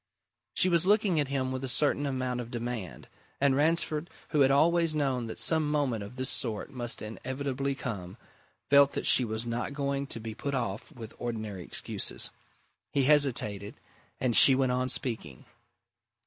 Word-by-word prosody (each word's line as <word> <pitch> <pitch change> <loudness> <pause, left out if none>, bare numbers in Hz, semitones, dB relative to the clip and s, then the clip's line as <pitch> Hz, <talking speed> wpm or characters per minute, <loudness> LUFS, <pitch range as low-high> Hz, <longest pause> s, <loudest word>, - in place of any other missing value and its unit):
She - - +4
was 175 0 +2
looking 205 -5 +3
at 145 - 0
him 130 -1 -2
with 130 0 -4
a - - -2
certain 145 +2 +2
amount 130 -2 -2
of 115 - -9
demand 120 - -6 0.3
and 140 -1 +3
Ransford, 155 +1 +1 0.2
who 150 - 0
had 135 -1 +5
always 165 +3 +3
known 130 -5 -1
that 110 - -7
some 155 +6 +2
moment 140 -8 -1
of 100 +5 -10
this 130 0 -1
sort 115 0 -2
must 120 -4 -4
inevitably 135 +4 -4
come, 100 -9 -6 0.5
felt 140 0 +6
that - - -3
she 130 - +6
was 110 0 -4
not 120 +4 -3
going 140 -1 -2
to 115 - -5
be 110 0 -6
put 140 +5 -4
off 110 -5 -4
with 115 -2 -10
ordinary 110 -5 -5
excuses. - - -2 0.6
He 140 - +1
hesitated 125 -8 +3 0.4
and 125 -3 0
she 135 - +9
went 130 -1 +1
on 130 +1 -1
speaking. 120 - -3
130 Hz, 170 wpm, -29 LUFS, 115-140 Hz, 0.6 s, she